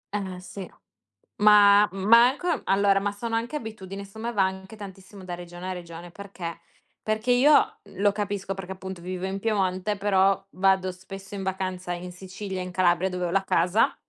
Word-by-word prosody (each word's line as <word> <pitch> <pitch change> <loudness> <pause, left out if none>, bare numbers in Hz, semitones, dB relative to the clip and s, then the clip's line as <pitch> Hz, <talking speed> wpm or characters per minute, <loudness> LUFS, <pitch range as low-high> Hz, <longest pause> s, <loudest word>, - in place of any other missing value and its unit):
Eh 190 -3 -4
sì. 185 0 -8 0.7
Ma 205 0 +7
ma 215 +5 +6
anche 345 +6 -2
allora, 195 0 +3
ma 200 +1 -1
sono 225 +3 -4
anche 235 +5 -2
abitudini, 200 -6 -6
secondo 200 +2 -13
me 235 +1 -2
va 205 - +2
anche 190 +2 -4
tantissimo 195 -1 -11
da 180 -1 -5
regione 175 +1 -8
a 185 - -2
regione. 170 -1 -9
Perché, 185 -3 -8 0.4
perché 215 +2 -2
io 275 +5 +5
lo 200 0 0
capisco 200 -1 -3
perché 190 -1 -7
appunto 190 -1 -7
vivo 185 +1 -4
in 195 +1 -4
Piemonte, 195 -1 0
però 195 -1 +2
vado 190 0 +2
spesso 195 +2 -10
in 195 - -4
vacanza 185 -1 -3
in 180 +1 -6
Sicilia, 190 +1 -6
in 180 0 -6
Calabria, 180 0 +2
dove 180 0 -2
ho - - -1
la 195 +1 +2
casa 180 +4 +2
195 Hz, 180 wpm, -26 LUFS, 185-205 Hz, 0.7 s, Ma